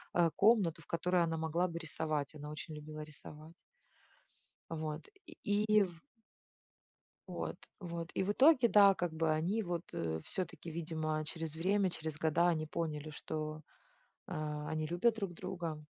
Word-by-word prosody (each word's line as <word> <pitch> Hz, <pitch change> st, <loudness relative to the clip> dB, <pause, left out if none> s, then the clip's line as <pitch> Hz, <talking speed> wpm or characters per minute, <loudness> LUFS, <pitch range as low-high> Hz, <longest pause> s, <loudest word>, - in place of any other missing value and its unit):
э, 170 Hz, -2 st, +4 dB
комнату, 195 Hz, -6 st, +4 dB
в -, -, -19 dB
которой 180 Hz, +1 st, +2 dB
она 165 Hz, -1 st, 0 dB
могла 160 Hz, +3 st, +1 dB
бы 170 Hz, -1 st, -5 dB
рисовать. 155 Hz, -3 st, -2 dB
Она 150 Hz, -1 st, -7 dB
очень 150 Hz, +1 st, -6 dB
любила 155 Hz, 0 st, -7 dB
рисовать. 155 Hz, +1 st, -11 dB, 1.2 s
Вот 155 Hz, -2 st, -4 dB, 0.2 s
и 210 Hz, -10 st, -1 dB
и 215 Hz, -1 st, +5 dB
в 175 Hz, -4 st, -4 dB, 1.3 s
вот -, -, -4 dB, 0.2 s
вот, 170 Hz, -2 st, -5 dB
и -, -, +1 dB
в 195 Hz, +2 st, +1 dB
итоге, 260 Hz, 0 st, +6 dB
да, 200 Hz, -2 st, +8 dB
как 175 Hz, -3 st, -2 dB
бы 160 Hz, 0 st, +1 dB
они 180 Hz, +8 st, +1 dB
вот, 175 Hz, -2 st, -2 dB
э, 80 Hz, -1 st, -2 dB
всё-таки, 180 Hz, -2 st, -3 dB
видимо, 155 Hz, -1 st, -2 dB
через 160 Hz, -1 st, -4 dB
время, 190 Hz, +4 st, +2 dB
через 160 Hz, -3 st, -4 dB
года 165 Hz, +2 st, +3 dB
они 155 Hz, -2 st, +1 dB
поняли, 155 Hz, -1 st, -3 dB
что, 155 Hz, 0 st, -4 dB, 0.6 s
а, 150 Hz, -3 st, -3 dB
они 155 Hz, 0 st, -1 dB
любят 175 Hz, +8 st, +3 dB
друг 200 Hz, -5 st, -3 dB
друга. 170 Hz, -4 st, -4 dB
165 Hz, 155 wpm, -35 LUFS, 155-180 Hz, 1.3 s, да